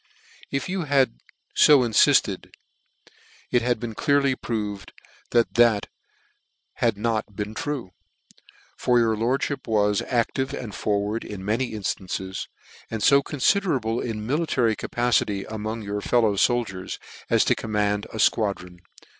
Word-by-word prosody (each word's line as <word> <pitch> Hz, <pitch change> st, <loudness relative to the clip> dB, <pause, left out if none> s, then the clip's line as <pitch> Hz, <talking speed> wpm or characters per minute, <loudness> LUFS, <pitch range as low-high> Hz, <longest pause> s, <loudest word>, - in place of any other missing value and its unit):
fc -, -, -26 dB
If 135 Hz, -1 st, -2 dB
you 185 Hz, -2 st, -2 dB
had 135 Hz, -, +2 dB, 0.4 s
fo 145 Hz, -3 st, +7 dB
infilled, 110 Hz, -, +3 dB, 1.0 s
it 120 Hz, -, +3 dB
has 120 Hz, +1 st, +1 dB
been 115 Hz, 0 st, -6 dB
clearly 140 Hz, +2 st, +2 dB
proved 105 Hz, -5 st, -4 dB, 0.4 s
that 120 Hz, -1 st, +2 dB
that 115 Hz, -4 st, +3 dB, 0.9 s
had 115 Hz, -4 st, +1 dB
not 110 Hz, -1 st, -2 dB
been 105 Hz, 0 st, -4 dB
true; 145 Hz, -, -4 dB, 0.8 s
for 125 Hz, -, +2 dB
your 115 Hz, -2 st, +3 dB
lordfnip 130 Hz, +5 st, -1 dB
was 105 Hz, -2 st, +2 dB
active 130 Hz, +3 st, -1 dB
and 110 Hz, -5 st, -7 dB
forward 105 Hz, +4 st, -1 dB
in 95 Hz, -2 st, -7 dB
many 115 Hz, +4 st, -1 dB
inflances, 95 Hz, -2 st, -4 dB, 0.4 s
and 110 Hz, -2 st, -3 dB
fo 140 Hz, +7 st, +6 dB
con 145 Hz, 0 st, -7 dB
fiderable 130 Hz, -, +1 dB
in 110 Hz, -3 st, -4 dB
military 130 Hz, -5 st, +1 dB
capacity 115 Hz, -5 st, 0 dB
among 110 Hz, +1 st, -5 dB
your 105 Hz, 0 st, -3 dB
fellow 115 Hz, -1 st, +2 dB
foldiers, 100 Hz, -3 st, 0 dB, 0.3 s
as -, -, +3 dB
to -, -, +4 dB
command 105 Hz, -1 st, -1 dB
a -, -, -9 dB
fquadron. 100 Hz, -5 st, 0 dB
115 Hz, 135 wpm, -24 LUFS, 105-125 Hz, 1.0 s, fo